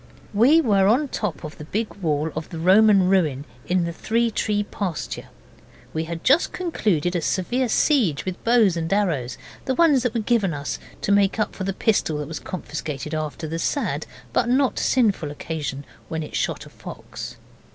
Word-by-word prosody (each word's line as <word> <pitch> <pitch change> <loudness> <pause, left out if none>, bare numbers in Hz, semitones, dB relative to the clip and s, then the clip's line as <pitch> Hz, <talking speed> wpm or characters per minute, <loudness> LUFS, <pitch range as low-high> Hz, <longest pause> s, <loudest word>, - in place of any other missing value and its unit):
We 260 +11 +6
were 200 -8 +3
on 235 +7 +4
the - - -4
top 190 - -3
of 155 +1 -8
the 150 - -7
big 215 +7 -2
wall 155 -4 0
of 155 0 -5
the 165 - -7
Roman 195 +2 +5
ruin 155 -8 +2 0.2
in 180 0 +2
the 170 0 -3
Three 230 +6 0
Tree 210 -1 0
pasture. 195 -5 -4 0.7
We 160 +1 -1
had 165 0 -6
just 285 +6 +4
concluded 195 - 0
a 175 - +1
severe 240 +10 0
siege 220 - +2
with 185 -1 -5
bows 230 -6 +4
and 165 0 -3
arrows 165 -12 0 0.3
the 260 - 0
ones 305 -5 +5
that 245 -1 -1
were - - +2
given 210 -7 +1
us 145 0 -4 0.2
to - - 0
make 200 0 +3
up 215 - 0
for 190 - -5
the 195 - 0
pistol 190 -7 +1
that 150 -1 -4
was 160 - -5
confiscated 150 -3 -5
after 155 +1 -3
the 165 +2 -3
sad 285 - -1 0.3
but 240 - +2
not 260 +1 +2
sinful 210 - +2
occasion 145 -2 -5 0.2
when 160 -1 -2
it 150 - -8
shot - - -1
a - - -12
fox. - - -9
190 Hz, 190 wpm, -23 LUFS, 160-225 Hz, 0.7 s, We